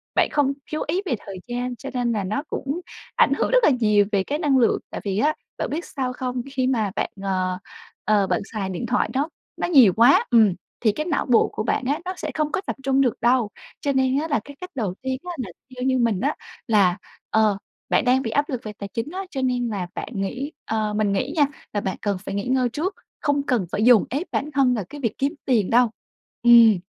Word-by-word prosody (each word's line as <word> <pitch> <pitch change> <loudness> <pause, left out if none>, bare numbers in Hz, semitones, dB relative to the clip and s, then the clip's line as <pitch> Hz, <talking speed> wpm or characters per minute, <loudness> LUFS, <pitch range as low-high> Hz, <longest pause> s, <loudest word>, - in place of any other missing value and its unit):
Bạn - - +3
không 280 -2 +2 0.2
chú 310 - -2
ý 350 +6 0
về 270 - 0
thời 195 -2 -7
gian, 245 +1 -3
cho 275 +3 -8
nên 245 -2 0
là 210 -3 -1
nó 215 +9 -2
cũng 280 +6 -3 0.3
ảnh - - +4
hưởng - - 0
rất - - +4
là - - +7
nhiều 210 -6 +3
về 200 -2 +2
cái 290 +8 -2
năng 290 -5 +3
lượng, 240 -3 +3
tại - - -6
vì 195 -2 -2
á 300 +5 +3 0.2
bạn - - -2
biết 330 +4 -3
sao 255 -3 -3
không? 250 0 -3
Khi 260 -2 +1
mà 220 -6 +1
bạn, - - -1
ờ, 185 -1 -1 0.5
ờ, 205 -2 +3
bạn - - 0
xài 200 -3 -2
điện 180 -2 -4
thoại, 250 - +1
nó 280 +4 0 0.3
nó - - -1
nhiều 260 - +7
quá, 280 - +6
ừm, 220 -6 +5 0.3
thì 220 - +3
cái 305 +9 -4
não 325 -4 0
bộ 245 -3 +4
của - - -2
bạn 255 - 0
á 285 +4 0
nó 370 - -2
sẽ - - -4
không 305 -1 -1
có - - -1
tập - - -3
trung 270 0 +3
được 250 -4 +3
đâu. 240 -2 +3 0.3
Cho 285 - 0
nên 265 0 +2
á 315 - -2
là 290 -7 +1
cái 285 +2 -11
cách 365 - -6
đầu 210 -8 -1
tiên 260 0 -2
á, 360 - -5
là 245 -8 -4 0.3
theo 250 - -4
như 260 -1 +2
mình 230 -6 +1
á, 285 +4 0 0.3
là, 200 -5 +4 0.3
ờ, 215 -2 +3 0.3
bạn - - +2
đang 255 +1 +4
bị 230 -4 -3
áp 285 +5 +1
lực 255 -4 -3
về 215 - -6
tài 200 -1 -8
chính 230 +6 -3
á, 370 - -5
cho 270 - -3
nên 250 -2 0
là 195 -5 -3
bạn - - -4
nghĩ 250 +9 -3
ờ, 215 -1 -1
mình 210 -1 +1
nghĩ 255 +9 -1
nha 295 -3 +5 0.3
là 205 - 0
bạn 190 - -3
cần 200 -2 0
phải - - -4
nghỉ 200 - -2
ngơi 255 -1 +2
trước, 330 - -3 0.2
không 285 -1 +1
cần 250 -9 0
phải 210 - 0
dồn 240 -2 +6
ép 290 +8 -2
bản 290 - -1
thân 265 -2 +3
vào 215 -6 -2
cái 290 - -9
việc 230 -5 -2
kiếm 275 +3 0
tiền 225 -7 +2
đâu. 240 0 +4 0.5
Ừm. 230 -4 +7
250 Hz, 250 wpm, -23 LUFS, 215-280 Hz, 0.5 s, là